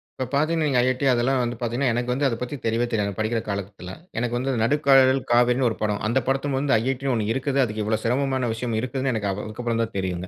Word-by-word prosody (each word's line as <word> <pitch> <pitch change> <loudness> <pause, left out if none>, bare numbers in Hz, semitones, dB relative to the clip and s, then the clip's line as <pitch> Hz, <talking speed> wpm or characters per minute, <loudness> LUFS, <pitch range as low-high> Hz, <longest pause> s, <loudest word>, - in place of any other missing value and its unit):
இப்ப 130 - -3
பார்த்தீங்கன்னா 155 +2 +1 0.2
"IIT"அதெல்லாம் 130 0 +2
வந்து 120 0 -2
பார்த்தீங்கன்னா, 120 +3 0
எனக்கு 120 +1 -1
வந்து 140 +3 0
அத 120 - -1
பத்தி 125 +3 -4
தெரியவே 115 +2 +1
தெரியாதுங்க. 100 -3 -1
படிக்கிற 110 +2 0
காலத்தில 100 -2 -5 0.3
எனக்கு 120 0 -1
வந்து 130 +2 -1
நடுக்கதல் 135 0 +4
காவிரின் 125 +2 +3
ஒரு 110 - -4
படம். 105 -1 0
அந்த 120 +4 +2
படத்துபொது 135 +1 0
"IIT"ன்னு 135 +1 -1
ஒண்ணு 110 -3 -1
இருக்குது. 135 +2 -1
அதுக்கு 110 -3 -2
இவ்வளோ 110 +1 0
சிரமமான 130 +1 0
விஷயம் 115 0 -3
இருக்குதுன்னு 130 -3 -2 0.2
அதுக்கப்புறம் 115 +2 -3
தான் 115 - -6
தெரியுங்க. 90 -1 -3
120 Hz, 185 wpm, -24 LUFS, 110-135 Hz, 0.3 s, நடுக்கதல்